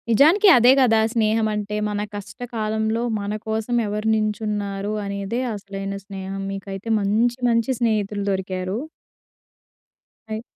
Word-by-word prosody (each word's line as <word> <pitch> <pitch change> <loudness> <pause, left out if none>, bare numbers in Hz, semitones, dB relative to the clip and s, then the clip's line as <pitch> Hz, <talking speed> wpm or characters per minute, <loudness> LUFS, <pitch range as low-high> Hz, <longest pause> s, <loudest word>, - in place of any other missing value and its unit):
నిజానికి 315 - +5
అదే 240 +1 +6
గదా! 230 -4 +5
స్నేహమంటే. 215 -2 0
మన 205 0 -2
కష్టకాలంలో 220 +1 -2 0.2
మన 200 +1 -3
కోసం 220 +2 -1
ఎవరు 210 +1 -2
నించున్నారు 210 -1 -2
అనేదే 200 +4 -3
అసలైన 195 -1 -5
స్నేహం. 195 0 -6
మీకైతే 195 +2 -6
మంచి 220 +5 +1
మంచి 230 +2 +2
స్నేహితులు 210 -3 0
దొరికారు. 185 0 -2 1.5
అయ్ 220 0 -3
210 Hz, 110 wpm, -22 LUFS, 200-225 Hz, 1.5 s, అదే